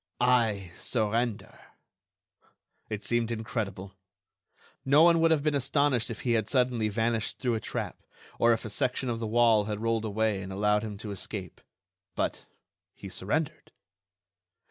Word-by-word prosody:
"I 115 -7 +2
surrender!"... 115 0 -1 1.3
It 105 -1 -4
seemed 120 -1 +1
incredible. 110 -4 -4 0.9
No 145 +4 +5
one 170 -1 +6
would 165 0 +4
have 155 -3 +2
been 150 -1 +1
astonished 135 -2 +1
if 115 - -6
he 120 - 0
had 110 -2 +1
suddenly 125 -4 +1
vanished 115 +1 -1
through 125 -2 0
a 110 - 0
trap, - - -5 0.4
or 115 - +5
if 115 -1 0
a 110 - -5
section 130 +1 -1
of 115 -1 -2
the 115 - -3
wall 115 -2 +4
had 105 -1 -3
rolled 115 0 0
away 110 -1 0
and 95 0 -7
allowed 105 +2 +2
him 105 -2 -6
to 105 - -4
escape. 95 -2 -6 0.5
But - - -2 0.5
he 100 - -9
surrendered! 125 - -3
115 Hz, 150 wpm, -28 LUFS, 105-125 Hz, 1.3 s, one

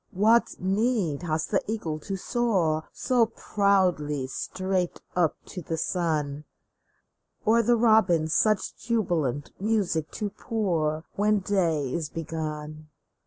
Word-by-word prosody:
What 220 +5 +3
need 195 - 0
has 160 -2 -1
the 195 - 0
eagle 165 -9 -3
to 195 +5 -4
soar 185 -9 0
So 245 -3 +2
proudly 185 - +1
straight 185 +6 -2 0.2
up 175 -4 +2
to 180 - -7
the 165 0 -3
sun? 155 -4 -1 1.0
Or 230 +2 +5
the 240 +2 +3
robin 215 -8 +4
such 215 +6 +1
jubilant 175 - -1
music 195 -7 0
to 210 -2 -3
pour 165 -10 -1
When 210 +1 +3
day 165 -9 0
is 160 -4 -2
begun? 155 -1 -5
180 Hz, 120 wpm, -26 LUFS, 155-210 Hz, 1.0 s, Or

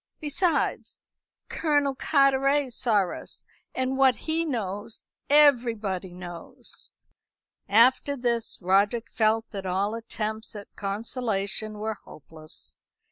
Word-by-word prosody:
Besides, 310 +2 0 0.5
Colonel 290 -3 +1
Carteret 275 -1 +2
saw 210 -7 +2
us, - - -7 0.3
and 260 +1 -1
what 265 -2 +5
he 325 +1 -1
knows 215 - -3 0.3
everybody 230 -10 +3
knows." 175 -1 -8 0.8
After 255 +6 +4
this, 235 -2 -1
Roderick 200 +5 +2
felt 225 0 +1
that 195 -2 -5
all 195 +3 0
attempts 220 -1 -4
at 205 -1 -10
consolation 210 0 -2
were 215 0 -3
hopeless. 155 +1 -11
225 Hz, 100 wpm, -26 LUFS, 200-270 Hz, 0.8 s, what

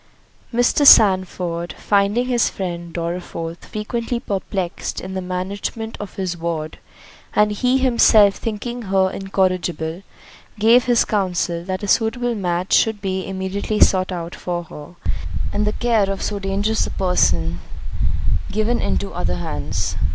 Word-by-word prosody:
Mr. 245 +4 +2
Sandford 180 - +5
finding 205 +4 +1
his 245 -2 +2
friend 175 -3 -5
Dorriforth 170 -1 -5
frequently 235 +3 -3
perplexed 190 -5 -3
in 190 +1 -7
the 190 - -3
management 195 +5 -4
of 205 -2 -7
his 185 -3 -2
ward, 165 -2 -4 0.6
and 210 0 +4
he 250 +5 +2
himself 230 -5 +5
thinking 235 +2 -4
her 190 -1 +3
incorrigible, 185 -3 -1 0.6
gave 230 +4 +5
his 240 -2 +3
counsel, 180 -4 -1
that 185 +1 -3
a - - -2
suitable 235 +3 +1
match 180 -3 -1
should 220 -2 +3
be 190 -2 -3
immediately 195 +2 -2
sought 185 0 +4
out 175 -1 -5
for 175 -1 -4
her, 155 +1 -11 0.6
and 210 0 0
the 210 - 0
care 225 -5 +1
of 195 -1 -3
so 205 -1 -2
dangerous 200 +3 0
a - - -6
person 85 - +1 0.9
given 215 +3 0
into 200 - -2
other 180 - -1
hands. 75 - -3
195 Hz, 135 wpm, -20 LUFS, 175-215 Hz, 0.9 s, Sandford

